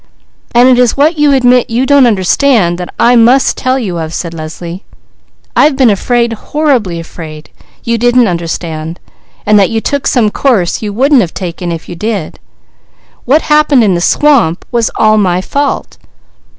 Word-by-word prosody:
"And 245 +1 +5
it 255 -1 +3
is 245 0 +1
what 305 +3 +1
you 295 -1 +3
admit 250 -2 +2
you 240 +3 0
don't 280 -2 +4
understand 195 -2 +1
that 180 - -7
I 245 +1 +4
must 245 +3 +3
tell 260 0 -1
you 190 -9 -4
of," 160 0 -5
said 170 -2 -5
Leslie. 170 +3 -8 0.7
"I've 295 -1 +3
been 260 -4 +3
afraid, 235 +3 0
horribly 235 - -1
afraid 160 -2 -10 0.3
you 235 0 -1
didn't 240 0 +3
understand, 165 -2 -5 0.5
and 210 0 +4
that 195 - +2
you 225 - -1
took 280 +4 -2
some 225 -5 +1
course 215 -11 0
you 210 -2 -4
wouldn't 265 +5 +2
have 175 -5 -4
taken 175 -1 -5
if 165 -1 -7
you - - -7
did. 205 -2 -4 0.9
What 290 +6 +2
happened 300 -4 +3
in 200 -3 +2
the 170 - -1
swamp 235 - +1
was 235 -2 0
all 215 0 +2
my 180 -3 +1
fault!" 280 +9 -3
225 Hz, 170 wpm, -10 LUFS, 175-260 Hz, 0.9 s, And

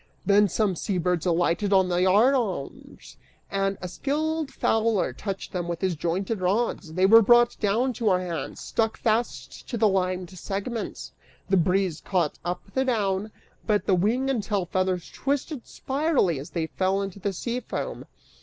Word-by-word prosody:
Then 205 0 +5
some 200 0 +1
sea 190 +3 -2
birds 180 0 0
alighted 175 +4 +1
upon 190 -2 +4
the 175 0 +1
yard 205 +8 +5
arms 200 - -4 0.3
and 195 0 0
a - - -2
skillful 310 - -1
fowler 225 -5 +1
touched 195 -2 -5
them 175 -2 -3
with 170 -1 -3
his 185 -3 0
jointed 185 +6 -2
rods: 190 -3 0
they 185 +2 +3
were 225 +4 +8
brought 240 +2 +5
down 230 +5 +1
to 225 -1 0
our 185 -1 +3
hands, 175 -3 -5
stuck 225 -1 -1
fast 230 +2 -2
to 240 - -2
the 220 -1 +4
limed 185 -2 -1
segments. 200 +5 -5 0.4
The 195 - +5
breeze 180 -1 +1
caught 175 -6 0
up 175 +1 -3
the 265 - +2
down, 210 -5 0 0.4
but 210 -1 +2
the 195 - +2
wing 220 +9 +1
and 265 -5 0
tail 200 -3 -1
feathers 185 -1 -1
twisted 280 -1 -3
spirally 270 - 0
as 140 - -8
they 165 -2 -2
fell 190 +4 0
into 195 0 -6
the 200 +1 -1
sea 235 +6 -3
foam. - - -5
195 Hz, 175 wpm, -26 LUFS, 180-230 Hz, 0.4 s, were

